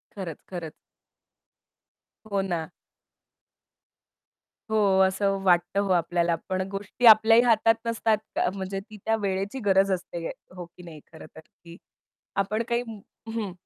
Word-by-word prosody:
खरंच, 175 -6 -6
खरंच. 170 -4 -6 1.6
हो 200 - +1
ना. 175 -4 -3 2.0
हो, 220 - +2 0.3
असं 195 +1 0
वाटतं 175 +1 +2
हो 200 - -1
आपल्याला, 170 0 +1
पण 185 0 -1
गोष्टी 200 +5 -3
आपल्याही 225 +1 +8
हातात 225 -1 +4
नसतात. 225 -1 +1 0.2
क - - +1
म्हणजे 195 0 -4
ती 215 +2 -13
त्या 225 - +2
वेळेची 200 +5 -2
गरज 195 0 +3
असते, 175 -2 -4 0.3
हो 180 -1 -7
की 180 +1 -17
नाही 165 -3 -11
खरंतर. 160 0 -13
की 170 +1 -16 0.6
आपण 210 +3 0
काही 235 0 +1 0.5
हं. 210 -5 -3
195 Hz, 125 wpm, -26 LUFS, 175-215 Hz, 2.0 s, आपल्याही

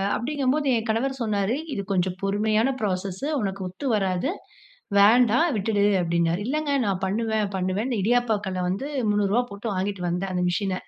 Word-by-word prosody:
அப்டிங்கும்போது 280 +2 0
என் 225 +1 -4
கணவர் 265 +5 0
சொன்னாரு, 205 +2 0 0.2
இது 200 - -2
கொஞ்சம் 185 0 0
பொறுமையான 215 +4 +1
ப்ராசஸ்ஸு, 190 +3 -2
உனக்கு 195 -1 -3
ஒத்து 185 +10 -8
வராது, 195 - 0 0.7
வேண்டாம் 245 +9 +5
விட்டுடு 205 0 +1 0.2
அப்டின்னாரு. 170 +1 0
இல்லங்க 300 +2 -1
நான் 190 -2 -1
பண்ணுவேன் 215 0 -1
பண்ணுவேன். 190 +7 -1
இடியாப்ப 230 0 +2
கல்ல 185 -1 -2
வந்து 220 +10 -2 0.2
300 205 +4 +1
போட்டு 200 +1 -4
வாங்கிட்டு 190 0 -2
வந்தேன் 185 +2 -2
அந்த 180 0 0
மிஷின. 190 +1 -1
205 Hz, 150 wpm, -25 LUFS, 190-240 Hz, 0.7 s, வேண்டாம்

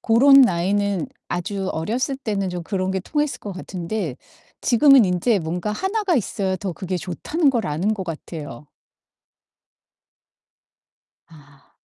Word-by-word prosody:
고런 275 +5 +6
나이는 195 -2 +1 0.2
아주 190 +2 -3
어렸을 245 - -2
때는 205 -7 -2
좀 180 -1 -5
그런 190 -1 -2
게 190 - -1
통했을 295 - -2
것 205 - -7
같은데 180 - -4 0.4
지금은 265 0 +6
인제 185 +4 +1
뭔가 175 +5 -3
하나가 385 - 0
있어야 195 -4 -1
더 185 0 -4
그게 185 +1 -4
좋다는 275 - -1
걸 235 -4 -1
아는 175 +9 0
것 195 - -5
같아요. 150 -4 -7 2.6
아. 145 -3 -20
195 Hz, 255 characters per minute, -22 LUFS, 175-235 Hz, 2.6 s, 고런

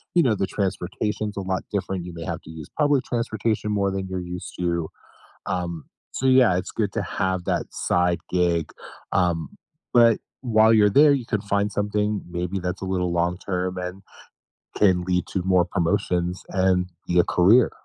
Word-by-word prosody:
you 170 - +5
know, 120 -6 +2
the 95 -1 -1
transportation's 105 +2 -2
a 100 - -3
lot 95 0 -2
different, 95 -3 -3
you 90 - -8
may 85 0 -7
have - - -4
to - - -13
use 80 -2 -9
public 145 -3 +3
transportation 110 -2 -1
more 100 -1 +1
than 95 0 -3
you're 95 -1 -4
used 90 0 -7
to. 85 -2 -1 0.6
Um, 85 -3 -3 0.3
so, 130 - -2
yeah, 130 -8 +5
it's 90 - -3
good - - -2
to - - -1
have 95 -1 -1
that - - 0
side 90 0 +1
gig, 85 -3 +1 0.4
um, 85 -4 +1 0.4
but 115 -2 +5 0.2
while 110 -3 +4
you're 105 -2 +5
there, 145 +7 +6
you 130 -4 -1
can 110 -4 -1
find 100 0 0
something 105 0 -1
maybe 90 +2 -3
that's 90 +1 -4
a - - -3
little 90 -1 -1
long 85 +1 +1
term, 90 -1 -3
and 90 +2 -6 0.7
can 95 -3 +3
lead 90 -1 0
to 95 - -1
more 90 -1 +3
promotions, 90 0 -1
and 95 -1 +2 0.2
be 90 - +1
a 85 - +6
career. 105 +10 +4
95 Hz, 180 wpm, -24 LUFS, 90-105 Hz, 0.7 s, there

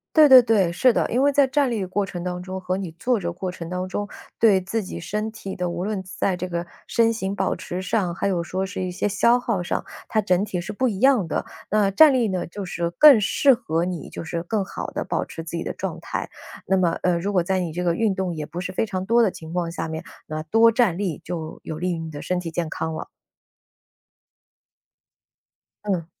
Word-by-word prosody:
对 305 -3 +8
对 255 -2 +10
对， 200 -7 +3
是 245 +7 +4
的， - - +1
因 255 +4 +2
为 285 - +4
在 280 -1 +4
站 270 -2 +1
立 210 -4 -1
过 195 +2 -1
程 175 -2 -6
当 180 0 -4
中 190 0 -6
和 185 0 -1
你 190 -4 -5
坐 245 -3 +1
着 170 -2 -3
过 185 +1 -4
程 170 -2 -8
当 180 +1 -3
中， 205 +2 -3 0.3
对 205 -5 +5
自 205 +3 -2
己 - - -7
身 215 +1 -3
体 195 -3 -7
的， 180 -1 -2
无 175 +1 -3
论 205 -2 -2
在 185 0 -1
这 185 +1 -3
个， 170 0 -3 0.2
身 230 -1 +2
形 200 -3 -3
保 190 -1 0
持 180 +1 -5
上、 185 -2 0
还 190 - -1
有 180 -3 0
说 185 +2 -3
是 190 -1 -4
一 180 - -3
些 195 +3 -1
消 235 +4 +3
耗 230 -7 -1
上， - - -2 0.2
它 215 - +1
整 185 0 +2
体 180 -4 -3
是 195 - -6
不 255 +5 0
一 200 -4 -2
样 260 -9 +4
的。 - - -1 0.3
那 210 -2 +3
站 285 +9 +7
立 245 -3 +2
呢， 185 -3 -2
就 200 +4 -7
是 170 -2 -3
更 285 +1 +8
适 265 +6 +4
合 170 -8 -1
你 180 -4 -4
就 - - -7
是 165 +1 -4
更 205 +3 -1
好 190 - -6
地 - - -3
保 - - -2
持 165 - -8
自 170 +1 -5
己 - - -3
的 - - -4
状 - - -5
态， - - -4 0.4
那 190 - +3
么， 175 -3 +3
呃， 180 -1 +2
如 200 +4 -2
果 180 - +4
在 190 +2 0
你 170 -3 -2
这 180 +1 -2
个 170 -1 +1
运 220 -3 +1
动 185 -3 -2
也 150 -1 -4
不 170 +4 -6
是 185 - -4
非 205 - 0
常 185 -3 -3
多 235 +1 +5
的 200 - +2
情 160 0 -10
况 170 -1 -2
下 165 - -4
面， 160 0 -5 0.2
那 155 0 -4
多 225 +7 +5
站 225 -7 +2
立 180 -7 -2
就 160 -3 -5
有 155 0 -6
利 180 0 -1
于 170 - -2
你 160 -1 -6
的 145 - -7
身 180 -1 -1
体 170 -2 -5
健 165 -1 -2
康 160 +1 -3
了。 - - -5 2.8
嗯。 180 -5 -1
185 Hz, 265 characters per minute, -23 LUFS, 175-215 Hz, 2.8 s, 对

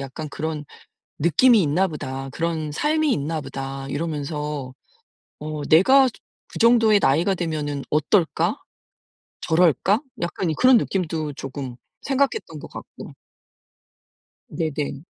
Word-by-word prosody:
약간 140 +3 -6
그런 155 0 -4 0.5
느낌이 210 - +5
있나 165 +6 +2
보다. 135 -4 -6
그런 160 0 -3
삶이 305 - +1
있나 155 +2 -2
보다.' 135 0 -6
이러면서 150 -2 -4 0.7
'어 150 0 -5
내가 260 +12 +6
저 - - -15 0.4
그 - - -8
정도의 230 -3 +5
나이가 170 +8 +2
되면 150 -5 -3
어떨까? 155 +3 +1 0.9
저럴까?' 180 - +3 0.2
약간 170 0 -2
이 155 - -1
그런 255 - +5
느낌도 160 -8 -1
조금 135 -2 -7 0.3
생각했던 280 +10 -1
것 - - -10
같고. - - -10 1.4
네네. 150 -3 -3
155 Hz, 240 characters per minute, -23 LUFS, 145-190 Hz, 1.4 s, 내가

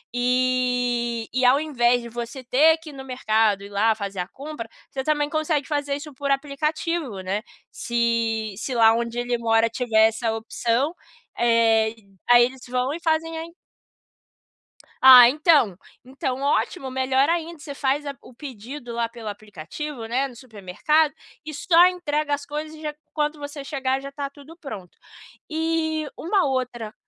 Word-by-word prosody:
Eh, 245 -2 +1
e 255 - 0
ao 260 +3 +5
invés 245 -5 +2
de 235 - -8
você 240 +2 -7
ter 310 +6 +5
que 320 -2 -11
ir - - -14
no 270 -1 -8
mercado, 220 -5 +1
ir 200 - -10
lá 215 +3 +2
fazer 200 -3 -6
a 180 - -2
compra, 275 -5 -8 0.2
você 265 -1 -4
também 295 -1 0
consegue 310 -1 -1
fazer 290 -2 -1
isso 295 0 -8
por 280 +1 -2
aplicativo, 295 - -2
né. 190 +3 -2 0.3
Se 230 -2 -1
se 255 +4 -4
lá 225 -2 +6
onde 235 +1 -2
ele 245 0 -1
mora 225 -1 +2
tiver 220 -2 +3
essa 225 0 -2
opção, 235 +7 -1 0.4
eh, 230 -2 +3
e 225 -3 -19 0.2
aí, 240 0 +8
eles 260 0 -7
vão 250 +2 -1
e 335 - -5
fazem 325 0 0
a - - -4
en 335 0 -12 1.5
Ah, 250 -2 +10
então 290 - +3 0.3
então, 265 0 -4
ótimo, 280 0 0
melhor 265 +2 +2
ainda, 335 -1 -2
você 290 -1 -8
faz 280 +1 -1
a 280 - -5
o 250 - -15
pedido 245 -1 -8
lá 235 0 -1
pelo 230 -2 -10
aplicativo, 215 - -7
né, 260 +4 0
no 250 - -13
supermercado 255 +7 0 0.3
e 310 - -6
só 340 +4 +5
entrega 305 -5 -1
as 285 0 -2
coisas 300 +2 -5
e - - -13
já 300 -1 -4 0.2
quando 300 0 -1
você 285 0 -7
chegar 270 -2 -2
já 275 0 -8
tá 280 0 -4
tudo 290 +3 -15
pronto. 200 - -9 0.5
E 315 -1 -1
uma 370 +2 +1
outra 250 -5 -3
260 Hz, 170 wpm, -23 LUFS, 230-300 Hz, 1.5 s, Ah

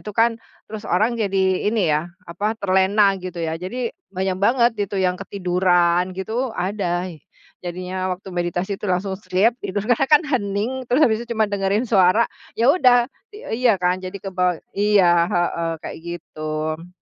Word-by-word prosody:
itu 210 - -6
kan, 230 +1 +5 0.4
terus 215 -1 -7
orang 215 +6 +2
jadi 200 -3 -1 0.3
ini 220 +1 0
ya 150 - +2 0.2
apa 170 +4 -7 0.2
terlena 190 +2 +3 0.2
gitu 180 -1 -7
ya, 160 - -1
jadi 235 +6 -3 0.2
banyak 190 -1 -2
banget 240 +2 +4 0.2
itu 200 - -4
yang 180 -1 +1
ketiduran 180 -2 +1
gitu 190 +3 -5 0.2
ada, 180 -2 -1 0.6
jadinya 185 +1 -4
waktu 185 +1 -8
meditasi 175 +2 -2
itu - - -4
langsung 190 +2 -1
sleep, 200 +6 +2
itu 190 - -6
karena 245 +4 +2
kan 300 +2 +7
hening 250 -1 -2
terus 250 +4 +2
habis 220 -2 +2
itu 235 0 -5
cuma 220 - +3
dengerin 200 +3 0
suara, 195 +2 +4 0.3
ya 240 +4 +5
udah 250 -8 +5 0.3
eee, 420 - -8
iya 240 - +6
kan, 180 +1 +2
jadi 185 +2 -5
kebawa 180 -2 +1 0.3
iya, 205 -1 +4 0.3
heeh, 170 -1 0
kayak - - -7
gitu. 155 -1 -5
190 Hz, 160 wpm, -21 LUFS, 180-220 Hz, 0.6 s, kan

